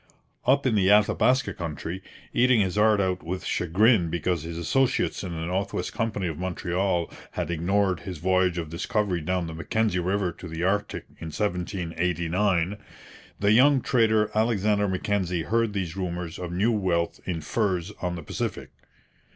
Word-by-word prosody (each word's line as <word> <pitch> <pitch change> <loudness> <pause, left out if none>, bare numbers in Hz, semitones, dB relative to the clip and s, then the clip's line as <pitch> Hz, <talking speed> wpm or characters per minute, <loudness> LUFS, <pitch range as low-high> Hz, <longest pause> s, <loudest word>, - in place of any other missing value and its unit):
Up 140 +2 +4
in 130 - +3
the 100 -3 +3
Athabaska 125 +5 +3
country, 85 +2 -5 0.3
eating 125 -1 +4
his 95 -2 +1
heart 105 0 +4
out 95 -2 0
with 90 +1 -5
chagrin 90 +2 +3
because 85 0 -1
his 85 +1 -6
associates 130 +10 +1
in 95 - -4
the 80 -1 -4
North 95 +3 -2
West 90 - -3
Company 110 -4 -2
of 80 -2 -3
Montreal 90 -1 -1 0.3
had - - -2
ignored 95 +2 +1
his 90 -3 -7
voyage 90 +1 +2
of 80 -3 -4
discovery 95 0 -1
down 90 +2 -1
the 80 - -6
Mackenzie 95 +4 0
river 95 +1 0
to 85 - -10
the 80 +1 -4
Arctic 100 +3 -1
in 80 - -6
1789, 90 +1 -1 0.6
the 100 0 +3
young 135 +5 +6
trader 110 -4 +2
Alexander 105 -2 +2
Mackenzie 95 -2 -1
heard 115 +2 +1
these 90 -4 -3
rumours 90 -3 -4
of 90 -1 -5
new 100 +7 +2
wealth 90 -6 0
in 85 -3 -2
furs 95 -2 -1
on 90 -1 -2
the 85 - -7
Pacific. - - -4
95 Hz, 160 wpm, -26 LUFS, 85-105 Hz, 0.6 s, young